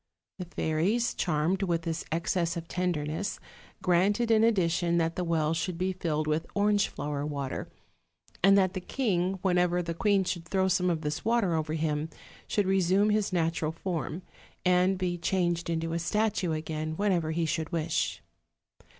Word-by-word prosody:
The 180 Hz, -, -4 dB
fairies, 175 Hz, +9 st, 0 dB
charmed 175 Hz, +3 st, 0 dB
with 170 Hz, -4 st, 0 dB
this 165 Hz, -1 st, -3 dB
excess 170 Hz, +1 st, 0 dB
of 165 Hz, 0 st, -6 dB
tenderness, 175 Hz, +1 st, -2 dB, 0.4 s
granted 200 Hz, +6 st, +2 dB
in 220 Hz, 0 st, +5 dB
addition 175 Hz, -5 st, +2 dB
that 165 Hz, 0 st, +1 dB
the 180 Hz, -, -1 dB
well 160 Hz, -2 st, +1 dB
should 170 Hz, +1 st, -2 dB
be 185 Hz, +2 st, 0 dB
filled 155 Hz, -4 st, -1 dB
with 155 Hz, +2 st, -1 dB
orange 205 Hz, 0 st, +3 dB
flower 145 Hz, 0 st, -4 dB
water; 140 Hz, -3 st, -4 dB, 0.8 s
and 195 Hz, +1 st, +7 dB
that 190 Hz, -1 st, +3 dB
the 185 Hz, -, -4 dB
king, 190 Hz, -4 st, 0 dB
whenever 180 Hz, -1 st, +2 dB
the 170 Hz, 0 st, -3 dB
queen 200 Hz, +2 st, +2 dB
should 175 Hz, -2 st, -3 dB
throw 190 Hz, +2 st, +1 dB
some 180 Hz, -1 st, +2 dB
of 165 Hz, -2 st, 0 dB
this 150 Hz, -1 st, -3 dB
water 225 Hz, -5 st, +2 dB
over 155 Hz, -1 st, -1 dB
him, 155 Hz, -1 st, -1 dB, 0.4 s
should 205 Hz, -, +1 dB
resume 190 Hz, +2 st, +3 dB
his 210 Hz, -1 st, +1 dB
natural 165 Hz, -2 st, 0 dB
form, 170 Hz, 0 st, -4 dB, 0.4 s
and 180 Hz, +1 st, +3 dB
be 180 Hz, -1 st, -2 dB
changed 175 Hz, -1 st, 0 dB
into 165 Hz, 0 st, -1 dB
a 170 Hz, -, 0 dB
statue 205 Hz, 0 st, 0 dB
again 155 Hz, 0 st, -3 dB
whenever 185 Hz, -6 st, +1 dB
he 165 Hz, +1 st, 0 dB
should 160 Hz, 0 st, -2 dB
wish. 160 Hz, -2 st, -1 dB
175 Hz, 165 wpm, -29 LUFS, 160-190 Hz, 0.8 s, and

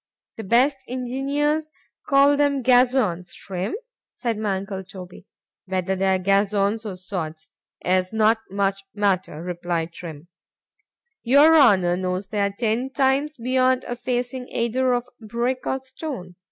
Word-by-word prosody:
—The 225 Hz, -, -5 dB
best 255 Hz, +7 st, +3 dB
engineers 280 Hz, +5 st, -1 dB, 0.4 s
call 280 Hz, 0 st, +5 dB
them 285 Hz, -2 st, +1 dB
gazons, 245 Hz, -8 st, +2 dB
Trim, 190 Hz, +3 st, -4 dB, 0.4 s
said 235 Hz, -3 st, -2 dB
my 210 Hz, -2 st, -1 dB
uncle 195 Hz, 0 st, -6 dB
Toby.—Whether 185 Hz, 0 st, -6 dB
they 190 Hz, 0 st, +2 dB
are -, -, +2 dB
gazons 200 Hz, +3 st, +1 dB
or 190 Hz, -3 st, -6 dB
sods, 165 Hz, -4 st, -6 dB, 0.3 s
is 185 Hz, 0 st, +1 dB
not 220 Hz, 0 st, +3 dB
much 195 Hz, 0 st, -1 dB
matter, 185 Hz, -6 st, 0 dB
replied 175 Hz, -2 st, -3 dB
Trim; 165 Hz, -2 st, -9 dB, 0.9 s
your 285 Hz, +6 st, +6 dB
Honour 190 Hz, -, +5 dB
knows 185 Hz, +1 st, -3 dB
they 210 Hz, -2 st, -1 dB
are 200 Hz, -, +2 dB
ten 225 Hz, +5 st, -1 dB
times 275 Hz, +2 st, +1 dB
beyond 255 Hz, +1 st, +2 dB
a 245 Hz, -, -4 dB
facing 250 Hz, +1 st, -3 dB
either 250 Hz, +2 st, 0 dB
of 245 Hz, 0 st, -1 dB
brick 240 Hz, +3 st, -2 dB
or 265 Hz, -, 0 dB
stone. 260 Hz, -, -7 dB
220 Hz, 135 wpm, -23 LUFS, 185-255 Hz, 0.9 s, your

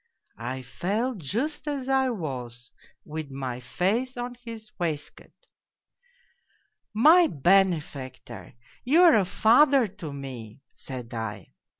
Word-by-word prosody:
I 130 Hz, +3 st, -4 dB
fell 215 Hz, -, -2 dB
just 235 Hz, -, -3 dB
as 280 Hz, -3 st, -3 dB
I 265 Hz, -1 st, +2 dB
was, 125 Hz, -, -6 dB, 0.3 s
with 155 Hz, -1 st, -6 dB
my 130 Hz, -2 st, -5 dB
face 220 Hz, -, -1 dB
on 245 Hz, 0 st, -4 dB
his 230 Hz, -3 st, -10 dB
waistcoat. 155 Hz, -4 st, -4 dB, 0.6 s
" 485 Hz, 0 st, -38 dB
' -, -, -44 dB, 0.2 s
My 350 Hz, 0 st, +6 dB
benefactor! 140 Hz, -, 0 dB, 0.3 s
You 315 Hz, +8 st, +5 dB
are 340 Hz, -3 st, +7 dB
a 205 Hz, -3 st, +3 dB
father 250 Hz, +7 st, +5 dB
to 190 Hz, -6 st, -8 dB
me! 135 Hz, -4 st, -9 dB
' -, -, -45 dB
said 125 Hz, -4 st, -8 dB
I. 110 Hz, -4 st, -6 dB
180 Hz, 125 wpm, -26 LUFS, -, 0.6 s, are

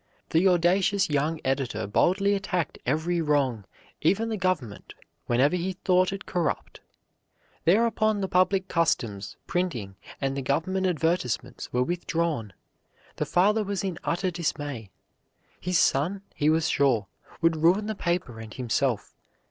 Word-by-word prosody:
The 170 Hz, +4 st, +4 dB
audacious 185 Hz, +1 st, +3 dB
young 150 Hz, +3 st, 0 dB
editor 130 Hz, -5 st, -1 dB
boldly 190 Hz, -, +2 dB
attacked 180 Hz, -5 st, -2 dB
every 165 Hz, +5 st, +1 dB
wrong, 135 Hz, -9 st, +1 dB, 0.4 s
even 200 Hz, +8 st, +2 dB
the 220 Hz, -, -1 dB
government, 185 Hz, -, -2 dB, 0.3 s
whenever 130 Hz, +8 st, +3 dB
he 180 Hz, +2 st, -2 dB
thought 185 Hz, 0 st, +2 dB
it 195 Hz, 0 st, -6 dB
corrupt. 175 Hz, -2 st, -2 dB, 0.9 s
Thereupon 215 Hz, +3 st, +3 dB
the 190 Hz, -, -1 dB
public 185 Hz, +1 st, +2 dB
customs, 105 Hz, -, -1 dB
printing, 160 Hz, -, -2 dB, 0.2 s
and 135 Hz, -1 st, -1 dB
the 140 Hz, -, -2 dB
government 180 Hz, +8 st, 0 dB
advertisements 160 Hz, -, -1 dB
were 125 Hz, +1 st, +2 dB
withdrawn. 165 Hz, -, -2 dB, 0.6 s
The -, -, -1 dB
father 210 Hz, +5 st, +3 dB
was 200 Hz, -1 st, -3 dB
in 190 Hz, -3 st, -3 dB
utter 180 Hz, +2 st, 0 dB
dismay. 145 Hz, -, -3 dB, 0.7 s
His 180 Hz, -1 st, 0 dB
son, 175 Hz, +10 st, +2 dB
he 150 Hz, -, +1 dB
was 160 Hz, 0 st, +2 dB
sure, 130 Hz, -9 st, +2 dB, 0.3 s
would 165 Hz, -1 st, +2 dB
ruin 175 Hz, +7 st, +3 dB
the 220 Hz, -, -2 dB
paper 170 Hz, -, -2 dB
and 110 Hz, -1 st, -9 dB
himself. 125 Hz, -1 st, -1 dB
165 Hz, 135 wpm, -26 LUFS, 135-185 Hz, 0.9 s, The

